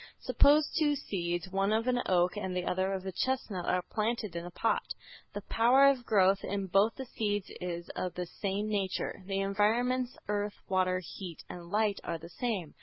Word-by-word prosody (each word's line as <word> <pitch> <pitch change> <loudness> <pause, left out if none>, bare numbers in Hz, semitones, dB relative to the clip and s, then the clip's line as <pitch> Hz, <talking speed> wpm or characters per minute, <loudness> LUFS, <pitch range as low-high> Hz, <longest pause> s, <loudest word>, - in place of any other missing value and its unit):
Suppose 295 +1 +5
two 295 -2 +3
seeds, 175 -7 -3
one 195 +1 +1
of 220 +1 +1
an 245 -1 +2
oak 180 0 +3
and 190 -3 -3
the 180 - -2
other 185 +1 0
of 190 -1 -3
a 190 - -3
chestnut, 210 -5 -2
are 180 0 +1
planted 215 -3 -2
in 170 - -3
a 175 - -6
pot. 225 +5 -1 0.4
The 205 - -4
power 245 +7 +5
of 270 -3 +3
growth 195 -2 +4
in 200 0 -2
both 195 +4 +3
the 265 - -6
seeds 205 -4 -2
is 175 -1 -4
of 180 - -4
the 180 - -3
same 200 +4 -3
nature. 200 -2 -2
The 195 0 -1
environments, 240 +6 +1
earth, 205 0 -1
water, 185 -1 +1 0.2
heat 180 -5 -7
and 175 -1 -8
light 210 0 +1
are 170 - -3
the 165 +1 -11
same. 195 -5 -3
195 Hz, 190 wpm, -31 LUFS, 185-225 Hz, 0.4 s, Suppose